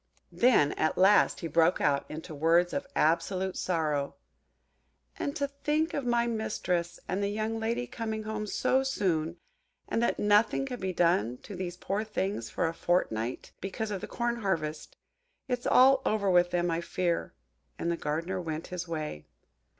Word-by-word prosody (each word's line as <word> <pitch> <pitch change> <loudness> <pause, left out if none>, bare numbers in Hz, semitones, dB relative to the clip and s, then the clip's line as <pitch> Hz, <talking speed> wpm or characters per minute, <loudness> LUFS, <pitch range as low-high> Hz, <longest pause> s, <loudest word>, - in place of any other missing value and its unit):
Then 235 - +4
at 155 - +1
last 195 +3 +5
he 165 - -2
broke 165 +3 +3
out 140 -1 +1
into 155 +1 -7
words 165 +4 +3
of 280 0 -2
absolute 180 +4 +1
sorrow:– 150 -5 -1 1.0
"And 285 - -2
to 280 - 0
think 295 +3 -1
of 275 -3 -2
my 240 0 +2
mistress 185 -7 -2
and 190 +2 -1
the 200 - 0
young 215 +2 -2
lady 235 +2 -1
coming 220 -2 -4
home 215 0 -4
so 260 +5 +2
soon, 175 -11 -1 0.5
and 230 - 0
that 235 - +1
nothing 210 +5 +3
can 250 -3 -5
be 190 0 -2
done 160 - +2
to 200 - -8
these 180 -1 -5
poor 200 +3 -2
things 195 - -3
for - - 0
a 165 - -2
fortnight, 125 -10 -1
because 210 +3 -3
of 195 -3 -3
the - - -5
corn 235 0 -1
harvest! 160 -8 -3 0.5
It's 250 -1 -2
all 265 +1 +6
over 200 -3 +1
with 175 0 +4
them, 175 -1 0
I 165 +1 -1
fear;" 175 -1 -2 0.4
and 170 - -1
the - - 0
Gardener 165 +5 -2
went 160 -1 -4
his 180 0 -4
way. 155 - -5
185 Hz, 170 wpm, -29 LUFS, 165-220 Hz, 1.0 s, all